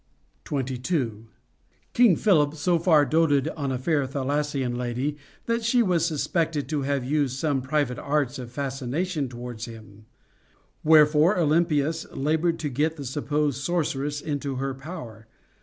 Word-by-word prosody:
23. 130 -4 -2 0.7
King 235 -7 +5
Philip 155 -8 +3
so 170 +3 +1
far 160 -4 +4
doted 145 -1 +2
on 140 -4 -3
a 130 - -1
fair 140 +1 0
Thessalian 140 -1 -1
lady, 125 +4 -2 0.3
that 230 0 0
she 235 +1 +3
was 180 -5 +1
suspected 160 -1 -1
to 150 -2 -1
have 140 -2 -1
used 140 -2 0
some 140 -2 0
private 135 -2 -1
arts 145 -2 -1
of 120 -2 -8
fascination 140 +4 -2
towards 120 -1 -7
him. 110 -2 -13 0.8
Wherefore 155 +3 +5
Olympias 160 -1 +1
labored 160 +4 0
to 150 - -2
get 150 +5 0
the 140 - -6
supposed 145 +1 -1
sorceress 145 -3 -1
into 140 -2 -3
her 135 +1 -2
power. 135 -7 -9
145 Hz, 140 wpm, -25 LUFS, 130-160 Hz, 0.8 s, King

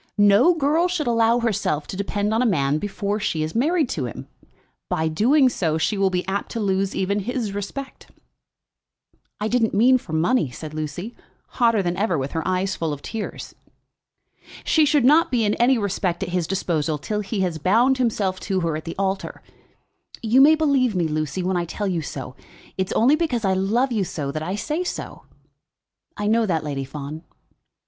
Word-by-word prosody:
No 205 - +5
girl 320 +3 +2
should 355 -4 -2
allow 230 0 +3
herself 200 -10 -1
to - - -7
depend 205 +2 -1
on 225 - +2
a - - +3
man 145 -6 +1
before 205 +1 -2
she 165 -7 -1
is 155 - -4
married 305 +5 +2
to 140 - -2
him. 120 - -7 0.6
By 160 0 0
doing 255 - +3
so 165 -10 0
she 160 +6 0
will 195 -1 +2
be 180 0 -2
apt 195 +1 -2
to 230 - -3
lose 195 -2 0
even 200 +2 0
his 225 0 -3
respect." 235 +7 -6 1.3
"I 210 - -1
didn't 225 -2 +1
mean 255 +5 +5
for 165 - -10
money," 165 - +2
said 150 +5 -8
Lucy, 155 +8 -5 0.3
hotter 230 -5 +2
than 175 0 -2
ever, 195 -4 +1
with 135 0 -3
her 160 - -2
eyes 185 +1 0
full 165 -2 -2
of 145 - -9
tears. 225 -2 -6 1.1
"She 315 -1 +3
should 290 -4 +3
not 310 +5 +5
be 235 -3 +1
in 205 - +2
any 250 +2 +4
respect 195 -3 -1
at 185 - -4
his 175 -2 -1
disposal 160 -5 -1
till 210 +9 -3
he 205 0 -3
has 175 -4 -1
bound 235 - +3
himself 205 -6 0
to 190 -2 -2
her 165 -2 -1
at 155 - -6
the 165 - -5
altar. 195 0 -3 0.8
You 235 +4 +4
may 305 +3 +7
believe 275 -8 +2
me, 175 -3 +1
Lucy, 155 +3 -2
when 185 0 0
I 175 - -1
tell 205 +4 -4
you 175 -3 -1
so. 135 -3 -7 0.4
It 190 -1 -1
is - - -4
only 260 +6 +4
because 265 -9 -1
I 190 - +2
love 220 +8 +1
you 215 -4 +1
so 150 -6 -4
that 155 - -4
I 180 +5 -3
say 305 - -2
so." - - -6 0.9
"I 205 - -3
know 225 +1 +2
that, 165 -4 0
Lady 140 -2 -3
Fawn." 145 +3 -7
200 Hz, 195 wpm, -22 LUFS, 165-235 Hz, 1.3 s, may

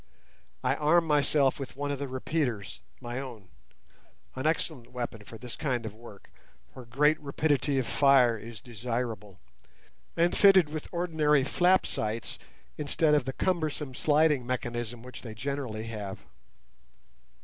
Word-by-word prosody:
I - - +2
armed 165 +2 +3
myself 145 -2 +3
with 135 -2 -6
one 145 +1 -2
of 140 - -3
the 140 - -3
repeaters—my 120 - -4
own; 115 -8 -8 0.9
an 130 +3 -1
excellent 155 -6 -2
weapon 120 -3 -5
for 115 - -11
this 120 +1 -8
kind 125 -6 -2
of 110 - -5
work, 110 -3 -14 0.4
where 130 - -10
great 150 +6 +3
rapidity 145 -1 0
of 130 - +1
fire 135 -4 +5
is 115 0 -9
desirable, 115 -5 -4 0.8
and 170 +1 +3
fitted 190 -6 +6
with 155 0 -6
ordinary 160 -5 +2
flap 180 +6 +3
sights 110 +2 -3 0.4
instead 150 +1 +2
of 145 -4 +3
the 135 - -3
cumbersome 155 -6 -1
sliding 150 -1 +3
mechanism 120 -2 -4
which 125 -2 -10
they 110 -3 -8
generally 125 -3 -4
have. 105 -4 -5
130 Hz, 140 wpm, -29 LUFS, 115-150 Hz, 0.9 s, fitted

